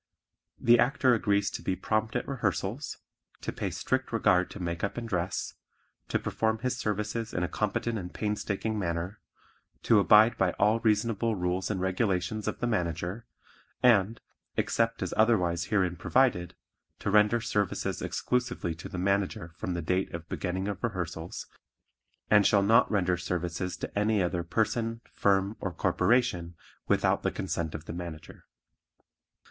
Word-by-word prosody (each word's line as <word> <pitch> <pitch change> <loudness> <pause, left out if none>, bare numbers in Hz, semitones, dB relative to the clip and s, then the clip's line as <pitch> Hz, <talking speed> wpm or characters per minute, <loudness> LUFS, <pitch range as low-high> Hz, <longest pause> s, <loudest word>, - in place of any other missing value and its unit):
The 120 0 +5
Actor 130 0 +3
agrees 100 -2 +1
to - - -5
be 95 - -1
prompt 110 +4 -1
at 125 - -1
rehearsals, 120 0 -2 0.4
to - - -3
pay - - -3
strict - - -2
regard 90 0 +3
to - - -9
makeup 85 +4 -3
and 120 -1 -4
dress, 90 -2 -2 0.5
to - - +1
perform 110 0 -1
his 125 +2 -2
services 110 0 -3
in 90 - 0
a - - +1
competent 110 +4 -1
and 90 -1 -7
painstaking 105 +1 -2
manner, 85 +2 -3 0.6
to 115 - +5
abide 110 +3 +6
by 95 -2 +2
all 105 +3 +3
reasonable 110 0 +1
rules 90 0 -1
and 100 -3 -1
regulations 95 +2 0
of - - -2
the - - +1
Manager, 90 0 -2 0.6
and, 115 -2 +4 0.4
except 115 0 +1
as - - -3
otherwise 90 -7 +3
herein 95 -4 +1
provided, 115 -5 +1 0.4
to 100 - -2
render 105 +3 +5
services 105 -3 -1
exclusively 125 -8 -1
to 80 - -9
the - - -6
Manager 95 -3 0
from 90 0 -3
the 85 - -3
date 90 +3 0
of 85 0 -8
beginning 95 +1 -3
of 100 -1 -4
rehearsals, 85 -6 -4 0.8
and 105 -2 +5
shall 100 -2 +4
not 115 +5 +5
render 90 -4 +1
services 90 +1 -3
to - - -6
any 105 0 +2
other 90 -1 -1
person, 115 +5 -1
firm 100 +1 +2
or 95 - -3
corporation 90 -3 +1 0.3
without - - +2
the - - +1
consent 80 -2 -3
of 80 0 -7
the - - -6
Manager. 85 -3 -8
100 Hz, 155 wpm, -29 LUFS, 90-110 Hz, 0.8 s, abide